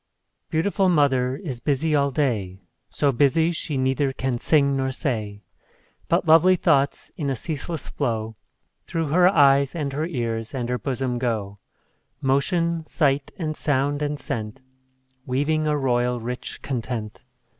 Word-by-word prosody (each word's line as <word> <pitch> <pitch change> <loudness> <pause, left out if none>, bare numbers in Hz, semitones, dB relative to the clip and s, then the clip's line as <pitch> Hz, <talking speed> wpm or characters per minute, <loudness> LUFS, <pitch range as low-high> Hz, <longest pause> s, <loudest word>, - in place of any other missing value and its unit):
_ - - -52
Beautiful 190 +4 +1
mother 135 -6 +2
is 135 -6 -6
busy 150 +4 0
all 140 -1 +3
day, 105 -10 -1 0.3
So 145 - +1
busy 145 +6 +3
she 155 -3 -4
neither 135 +1 +1
can 130 -2 -2
sing 140 -1 +3
nor 135 0 0
say; 110 -7 -3 0.6
But - - +1
lovely 165 +4 +6
thoughts, 145 -6 +1
in 145 -4 -2
a 135 - 0
ceaseless 160 +3 -5
flow, 115 -5 -2 0.5
Through 165 -3 -2
her 180 +4 +5
eyes, 140 -5 +4
and 145 -4 -3
her 155 +3 -1
ears, 115 -6 -3
and 120 -2 -3
her 125 0 -1
bosom 130 -2 -2
go 105 -5 -2 0.6
Motion, 165 +5 +1
sight, 140 -3 +1
and 155 -4 -3
sound, 145 0 0
and 145 0 -2
scent, 115 -1 -5 0.6
Weaving 150 +4 0
a 150 -1 +1
royal, 125 -2 +1
rich 125 +2 -6
content. 115 -4 -4
140 Hz, 145 wpm, -24 LUFS, 125-155 Hz, 0.6 s, lovely